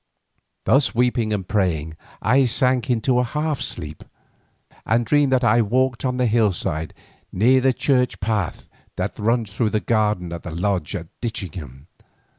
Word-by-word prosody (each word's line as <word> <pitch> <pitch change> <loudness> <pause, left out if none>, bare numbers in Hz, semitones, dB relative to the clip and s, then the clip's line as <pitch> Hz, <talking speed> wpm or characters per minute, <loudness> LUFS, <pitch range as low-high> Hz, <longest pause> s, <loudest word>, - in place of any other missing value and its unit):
Thus 135 -2 +3
weeping 120 -2 +1
and 100 -4 -2
praying 80 -6 -1 0.3
I 130 +5 +4
sank 125 +1 +1
into 125 +1 +2
a - - +3
half 150 +3 -2
sleep, 75 +1 -4 0.8
and 115 +1 +1
dreamed 145 0 +3
that 130 -1 +2
I 115 +1 +4
walked 125 +3 0
on 125 -1 -1
the 125 - +2
hillside 95 -8 0 0.4
near 125 +7 +4
the 130 +1 +4
church 125 -1 +1
path 105 -3 -2 0.3
that - - -3
runs 115 -1 0
through 110 +2 0
the 110 - 0
garden 105 -6 0
of 85 -1 -6
the - - -7
Lodge 90 -2 -1
at 85 - -5 0.2
Ditchingham. 85 - -5
115 Hz, 155 wpm, -22 LUFS, 95-125 Hz, 0.8 s, I